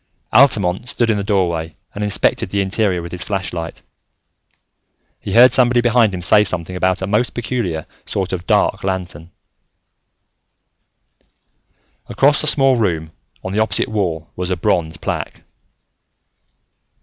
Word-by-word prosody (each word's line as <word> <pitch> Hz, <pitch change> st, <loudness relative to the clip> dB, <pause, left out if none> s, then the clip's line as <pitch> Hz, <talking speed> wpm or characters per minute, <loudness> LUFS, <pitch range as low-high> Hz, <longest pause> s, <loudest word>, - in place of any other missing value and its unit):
Altamont 110 Hz, -4 st, +3 dB
stood 115 Hz, -2 st, +1 dB
in 105 Hz, -, 0 dB
the 100 Hz, -, -2 dB
doorway 85 Hz, -6 st, -1 dB, 0.2 s
and 105 Hz, -, -4 dB
inspected 105 Hz, -2 st, 0 dB
the 100 Hz, -, -1 dB
interior 95 Hz, -2 st, 0 dB
with 85 Hz, -, -8 dB
his 90 Hz, -, -7 dB
flashlight; 90 Hz, -4 st, -5 dB, 1.4 s
he -, -, -6 dB
heard 125 Hz, +2 st, +7 dB
somebody 125 Hz, -1 st, +3 dB
behind 120 Hz, -2 st, +3 dB
him 90 Hz, -2 st, -5 dB
say 105 Hz, +4 st, +5 dB
something 90 Hz, -2 st, -3 dB
about 95 Hz, 0 st, 0 dB
a -, -, 0 dB
most 105 Hz, +5 st, 0 dB
peculiar 115 Hz, -10 st, -3 dB, 0.2 s
sort 95 Hz, -1 st, -3 dB
of 90 Hz, -1 st, -5 dB
dark -, -, +1 dB
lantern. 90 Hz, -4 st, -4 dB, 2.8 s
Across 145 Hz, +2 st, +2 dB
the 155 Hz, -, -1 dB
small 135 Hz, -3 st, +4 dB
room, 80 Hz, -8 st, -1 dB, 0.3 s
on 95 Hz, -, -5 dB
the 105 Hz, -, -1 dB
opposite 110 Hz, -4 st, +1 dB
wall, 90 Hz, -7 st, -3 dB
was 90 Hz, 0 st, -4 dB
a 90 Hz, -, -1 dB
bronze 80 Hz, -1 st, 0 dB
plaque. -, -, -5 dB
95 Hz, 135 wpm, -18 LUFS, 90-115 Hz, 2.8 s, heard